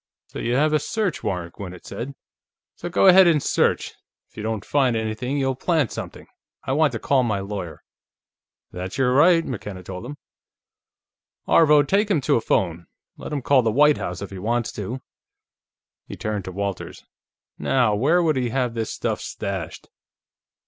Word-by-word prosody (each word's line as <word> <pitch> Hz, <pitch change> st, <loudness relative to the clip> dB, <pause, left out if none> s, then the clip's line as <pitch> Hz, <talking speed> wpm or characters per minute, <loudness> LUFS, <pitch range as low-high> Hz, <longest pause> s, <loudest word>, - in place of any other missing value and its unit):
"So -, -, -7 dB
you 120 Hz, +1 st, -1 dB
have 155 Hz, +3 st, +2 dB
a 155 Hz, -, +4 dB
search 210 Hz, +1 st, -2 dB
warrant," 90 Hz, -3 st, -3 dB
Gwinnett 90 Hz, -3 st, -9 dB
said. 120 Hz, +8 st, -6 dB, 0.6 s
"So 175 Hz, -, -6 dB
go 175 Hz, -, +2 dB
ahead 190 Hz, -1 st, +8 dB
and 165 Hz, -3 st, +5 dB
search; -, -, +1 dB, 0.4 s
if -, -, -31 dB
you 110 Hz, -, -6 dB
don't 110 Hz, -2 st, -3 dB
find 135 Hz, -5 st, +2 dB
anything, 110 Hz, +5 st, -2 dB
you'll 135 Hz, -1 st, +1 dB
plant 150 Hz, -, 0 dB
something. -, -, -7 dB, 0.4 s
I 130 Hz, -, -3 dB
want 145 Hz, -1 st, +2 dB
to 115 Hz, -, -3 dB
call 135 Hz, +3 st, +2 dB
my 110 Hz, -5 st, 0 dB
lawyer." 95 Hz, -4 st, -6 dB, 0.9 s
"That's 90 Hz, +4 st, -6 dB
your 125 Hz, -2 st, +2 dB
right," 165 Hz, +4 st, +5 dB
McKenna 105 Hz, -6 st, -6 dB
told 90 Hz, +5 st, -7 dB
him. 145 Hz, +2 st, -8 dB, 1.3 s
"Aarvo, 150 Hz, -2 st, +6 dB
take 200 Hz, +8 st, +1 dB
him 190 Hz, -7 st, +3 dB
to -, -, +2 dB
a 115 Hz, -, +1 dB
phone; 85 Hz, -5 st, -1 dB, 0.3 s
let -, -, -8 dB
him 145 Hz, -3 st, -3 dB
call 140 Hz, -1 st, +4 dB
the 115 Hz, -2 st, +1 dB
White 150 Hz, +5 st, +5 dB
House 90 Hz, +2 st, -4 dB
if 100 Hz, -, -8 dB
he 95 Hz, -, -7 dB
wants 115 Hz, +4 st, -1 dB
to." 115 Hz, +6 st, -5 dB, 1.1 s
He -, -, -7 dB
turned 105 Hz, -3 st, -3 dB
to 95 Hz, -, -5 dB
Walters. 100 Hz, 0 st, -5 dB, 0.6 s
"Now, 125 Hz, -5 st, +2 dB
where 150 Hz, +12 st, +3 dB
would 155 Hz, -4 st, +2 dB
he 125 Hz, -2 st, 0 dB
have 125 Hz, -1 st, -1 dB
this 115 Hz, -2 st, -3 dB
stuff -, -, -2 dB
stashed?" 95 Hz, -4 st, -5 dB
120 Hz, 175 wpm, -23 LUFS, 100-145 Hz, 1.3 s, ahead